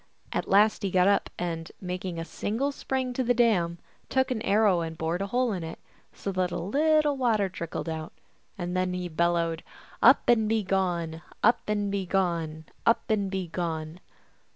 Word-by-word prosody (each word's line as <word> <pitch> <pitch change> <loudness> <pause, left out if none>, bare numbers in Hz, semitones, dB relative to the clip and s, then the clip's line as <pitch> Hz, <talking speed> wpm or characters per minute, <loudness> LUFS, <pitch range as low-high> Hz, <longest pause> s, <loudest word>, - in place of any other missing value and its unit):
At - - -2
last 210 +3 +4
he 200 - -1
got 180 0 +3
up, 200 - +2
and, 165 -2 -4
making 180 -1 -4
a 165 - -4
single 235 +11 -2
spring 260 -2 -2
to 260 - 0
the 245 0 +2
dam, 190 -8 +2 0.3
took 260 0 +1
an 230 -4 -1
arrow 205 -5 +3
and 160 -1 -5
bored 165 +3 -1
a 195 - -1
hole 245 +1 +1
in 180 -3 -4
it, 160 0 -6 0.3
so 200 - -5
that 185 -1 0
a - - -3
little 300 - +2
water 225 -7 +1
trickled 170 -2 -5
out, 160 -1 -4 0.5
and 175 -1 -3
then 185 0 0
he 180 -1 -3
bellowed, 170 0 0 0.2
" - - -23
Up - - +6
and 220 -3 +4
begone! 185 -6 0 0.2
Up 235 +2 +5
and 205 -1 0
begone! 175 -5 -1 0.2
Up 230 0 +2
and 200 -3 +1
begone 170 -3 -3
185 Hz, 175 wpm, -27 LUFS, 170-220 Hz, 0.5 s, Up